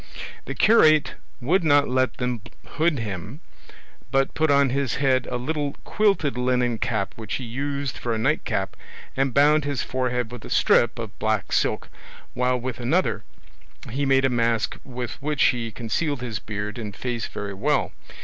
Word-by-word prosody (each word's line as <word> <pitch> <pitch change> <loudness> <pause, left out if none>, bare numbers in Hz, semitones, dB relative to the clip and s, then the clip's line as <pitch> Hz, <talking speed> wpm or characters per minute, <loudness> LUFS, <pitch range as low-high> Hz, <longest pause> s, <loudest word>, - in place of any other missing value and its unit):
The - - -5
curate 155 -9 +5 0.3
would 170 +9 +2
not 145 -2 +4
let 130 0 +1
them 125 -3 -2 0.2
hood 160 -1 0
him, 105 - -5 0.7
but 135 +2 +1
put 160 0 +1
on 140 -2 +4
his 140 -1 0
head 130 -2 +2
a 125 - -2
little 145 +2 -2
quilted 195 - +1
linen 125 -2 +1
cap 100 - -1
which 110 -2 -4
he 130 - -4
used 140 +3 -3
for 120 - -2
a 115 - 0
night 110 - +1
cap, - - -2 0.4
and 135 0 +1
bound 150 +3 +4
his 145 -3 -2
forehead 125 -2 -1
with 125 -3 -8
a - - -9
strip 120 - +3
of 110 -3 -7
black 110 -1 0
silk, - - +1 0.5
while 125 0 +1
with 125 0 -5
another 120 - +1 0.7
he 140 +3 -1
made 135 0 +4
a - - +3
mask 115 -2 +1
with 125 0 -6
which 150 -2 +1
he 115 -2 +2
concealed 120 +6 -2
his 120 -4 -3
beard 105 +1 -5
and 105 -4 -6
face 120 -1 -3
very 100 -1 -5
well. 95 - 0
125 Hz, 170 wpm, -24 LUFS, 115-140 Hz, 0.7 s, curate